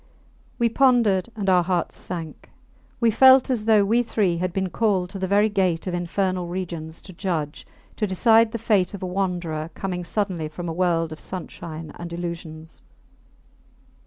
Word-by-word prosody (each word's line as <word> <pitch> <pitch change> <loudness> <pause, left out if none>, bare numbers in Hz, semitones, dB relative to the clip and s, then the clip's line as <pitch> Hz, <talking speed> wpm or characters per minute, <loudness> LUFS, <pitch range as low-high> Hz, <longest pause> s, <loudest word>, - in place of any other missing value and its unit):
We 235 - +3
pondered, 230 -6 +3
and 205 -3 -4
our 180 -2 +5
hearts 175 -1 -1
sank. 165 -3 -7 0.5
We 230 -2 +3
felt 260 +3 +6
as 225 -4 -1
though 215 -3 +5
we 230 +4 +3
three 200 -7 0
had 180 +1 -1
been 190 0 -2
called 195 -5 0
to 195 - -6
the 190 - -1
very 205 +2 +4
gate 185 -5 0
of 185 - -3
Infernal 180 +1 -1
Regions 170 -3 -5
to 190 - -12
judge, 165 -5 -3 0.3
to 210 - 0
decide 225 +4 +4
the 230 - -3
fate 210 -4 +1
of 195 - -8
a - - -1
wanderer 175 -4 -2
coming 180 -2 -3
suddenly 180 -3 -2
from 175 +3 -7
a 165 - -3
world 165 -2 +1
of 155 - -8
sunshine 165 -3 -7
and 170 0 -6
illusions. 165 -2 -6
185 Hz, 170 wpm, -23 LUFS, 170-205 Hz, 0.5 s, felt